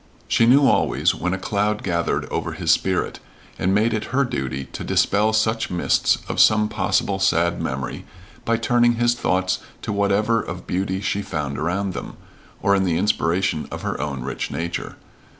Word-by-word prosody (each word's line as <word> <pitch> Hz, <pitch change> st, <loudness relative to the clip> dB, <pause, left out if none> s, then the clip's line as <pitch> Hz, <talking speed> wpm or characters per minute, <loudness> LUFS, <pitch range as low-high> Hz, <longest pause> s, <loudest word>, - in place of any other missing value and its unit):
She 115 Hz, -, +3 dB
knew 135 Hz, +3 st, +6 dB
always -, -, +2 dB
when 90 Hz, -, -2 dB
a 95 Hz, -, -1 dB
cloud 105 Hz, +2 st, -1 dB
gathered 85 Hz, -2 st, -1 dB
over -, -, -2 dB
his -, -, +1 dB
spirit, -, -, 0 dB, 0.4 s
and 95 Hz, -, +1 dB
made 110 Hz, +4 st, +2 dB
it 110 Hz, -, -2 dB
her 135 Hz, +3 st, +1 dB
duty 65 Hz, -, -3 dB
to -, -, -6 dB
dispel 105 Hz, +2 st, +2 dB
such 110 Hz, +1 st, +1 dB
mists 90 Hz, -, +2 dB
of -, -, -3 dB
some 110 Hz, 0 st, +5 dB
possible 100 Hz, -1 st, 0 dB
sad 85 Hz, -2 st, +2 dB
memory 65 Hz, 0 st, -4 dB, 0.4 s
by 115 Hz, 0 st, +1 dB
turning 120 Hz, 0 st, +3 dB
his 120 Hz, 0 st, +2 dB
thoughts 95 Hz, -5 st, 0 dB, 0.2 s
to -, -, -2 dB
whatever 100 Hz, +3 st, +2 dB
of 90 Hz, +2 st, -7 dB
beauty 95 Hz, +1 st, -2 dB
she 100 Hz, 0 st, -1 dB
found 75 Hz, -7 st, -4 dB
around 90 Hz, +4 st, -1 dB
them, -, -, -7 dB, 0.5 s
or 100 Hz, -, +4 dB
in 95 Hz, -1 st, +3 dB
the 85 Hz, -3 st, +1 dB
inspiration 90 Hz, -4 st, 0 dB
of -, -, -7 dB
her -, -, -3 dB
own 70 Hz, -3 st, -3 dB
rich 70 Hz, -, -4 dB
nature. 85 Hz, +1 st, -4 dB
100 Hz, 175 wpm, -22 LUFS, 85-110 Hz, 0.5 s, knew